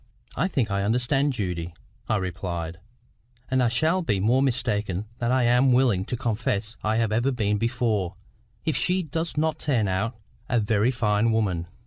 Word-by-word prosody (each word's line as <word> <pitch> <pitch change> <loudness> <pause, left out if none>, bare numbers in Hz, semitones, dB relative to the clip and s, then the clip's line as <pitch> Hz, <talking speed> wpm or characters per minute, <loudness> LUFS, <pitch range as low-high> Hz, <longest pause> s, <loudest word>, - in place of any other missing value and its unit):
"I 180 - +1
think 125 - -1
I 100 0 0
understand 125 +7 +1
Judy," 90 -6 -3 0.3
I 110 - +3
replied; 85 -3 -3 0.7
"and 130 -1 +3
I 125 - +4
shall 155 +10 +2
be 105 - 0
more 120 +7 +3
mistaken 105 -7 0
than 120 0 0
I 130 -1 +3
am 125 +2 +4
willing 120 -7 +3
to 125 - -3
confess 110 -3 -2
I 110 +1 +1
have 115 -1 +1
ever 120 +5 +2
been 105 -4 0
before, 115 -6 0 0.5
if 160 - +1
she 185 +1 +1
does 160 +1 -4
not 155 0 +1
turn 120 -8 +1
out 100 +5 -1 0.3
a 120 - +3
very 110 +1 +2
fine 115 -2 +1
woman. 95 -7 0
115 Hz, 170 wpm, -25 LUFS, 100-130 Hz, 0.7 s, I